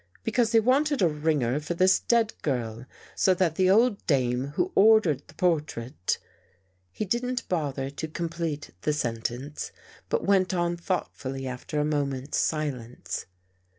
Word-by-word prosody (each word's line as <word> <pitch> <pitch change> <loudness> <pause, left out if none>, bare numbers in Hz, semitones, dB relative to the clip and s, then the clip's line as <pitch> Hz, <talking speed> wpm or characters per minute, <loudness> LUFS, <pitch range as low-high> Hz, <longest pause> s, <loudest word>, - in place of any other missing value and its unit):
Because 225 0 +1
they 225 - +6
wanted 270 +2 +2
a - - +6
ringer 150 -4 0
for 155 +3 -4
this 185 +2 +4
dead 230 -2 +2
girl 120 -3 -2 0.3
so 185 - +3
that 175 -3 +2
the 185 +2 +2
old 220 +2 +4
dame 130 -3 +1
who 370 - 0
ordered 195 -10 +4
the 145 - -17
portrait.. 150 - -1 0.4
." 90 - -38 0.3
He 210 - -3
didn't 245 +5 -1
bother 140 -6 -2
to 160 +3 -5
complete 165 -2 -4
the 150 - +1
sentence, 120 +2 -3 0.4
but - - 0
went 190 -2 +3
on 175 0 +1
thoughtfully 140 -6 -3
after 130 +3 -4
a 150 - +2
moment's 140 -2 -1
silence. 135 -6 -3
155 Hz, 150 wpm, -27 LUFS, 135-190 Hz, 0.4 s, they